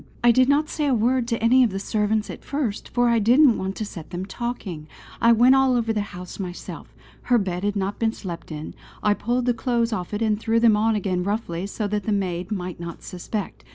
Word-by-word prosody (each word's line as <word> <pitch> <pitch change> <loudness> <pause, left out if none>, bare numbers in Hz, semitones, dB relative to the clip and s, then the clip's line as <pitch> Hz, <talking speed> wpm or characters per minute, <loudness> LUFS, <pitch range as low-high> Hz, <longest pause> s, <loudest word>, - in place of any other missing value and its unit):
"I 240 - +7
did 255 +3 +4
not 295 +2 +3
say 300 -2 -2
a 265 - +3
word 240 +2 +1
to 230 -2 -2
any 255 +3 +6
of 240 - +3
the 195 - -4
servants 210 +1 -1
at - - -10
first, 265 -8 -3
for 245 0 +2
I 235 -1 +3
didn't 245 +4 +5
want 190 +1 -3
to 215 - -3
set 165 -6 -9
them 180 +2 -4
talking. 200 -9 -5 0.3
I 235 - +6
went 240 +3 +6
all 265 -1 +4
over 230 -2 +1
the 210 - 0
house 180 -2 -8
myself. 180 -2 -7 0.3
Her 245 - +3
bed 185 -3 -2
had 205 0 0
not 200 0 -2
been 225 -1 +2
slept 175 -7 -8
in; 155 0 -6 0.3
I 210 - +4
pulled 240 +4 -1
the 245 - +3
clothes 235 -1 0
off 180 -5 -4
it 210 +2 -1
and 215 -1 +1
threw 225 0 +1
them 230 -2 +5
on 220 +1 +2
again 185 -3 -1
roughly 195 -3 -2
so 210 +1 -3
that 205 -1 -2
the 220 - -1
maid 185 -2 -2
might 180 -4 -4
not 170 -1 -8
suspect. 190 +3 -5
215 Hz, 235 wpm, -23 LUFS, 190-240 Hz, 0.3 s, I